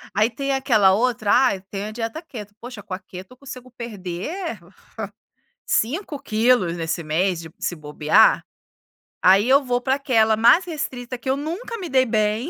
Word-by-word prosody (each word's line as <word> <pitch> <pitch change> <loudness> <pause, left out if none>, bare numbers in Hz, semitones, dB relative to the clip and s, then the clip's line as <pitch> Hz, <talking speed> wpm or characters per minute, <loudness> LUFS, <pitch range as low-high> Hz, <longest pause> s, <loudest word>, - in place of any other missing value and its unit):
Aí 215 +3 +3
tem 275 +4 -3
aquela 220 -8 +4
outra 225 -1 +1
ai 245 -8 +3
tenho 200 +1 -4
a - - -6
dieta 230 +7 -5
keto, 210 - -10
poxa 240 -4 -9
com 185 - -8
a 185 - -4
keto 185 +2 -11
eu - - -20
consigo 255 -2 -11
perder, 230 - -6 1.1
5 290 - -1
quilos 215 -7 +2
nesse 165 0 -3
mês 175 +3 0
de 165 - -9
se 175 - -2
bobear. 150 +7 +3 0.8
Aí 195 +5 +5
eu 275 +2 +5
vou 245 -1 0
para 265 +2 +1
aquela 225 -6 +2
mais 240 - +5
restrita 255 -6 -5
que 250 +2 -6
eu 270 - +1
nunca 350 +11 -5
me 365 -4 -6
dei 260 -1 +3
bem, 215 +4 0
230 Hz, 175 wpm, -22 LUFS, 195-265 Hz, 1.1 s, Aí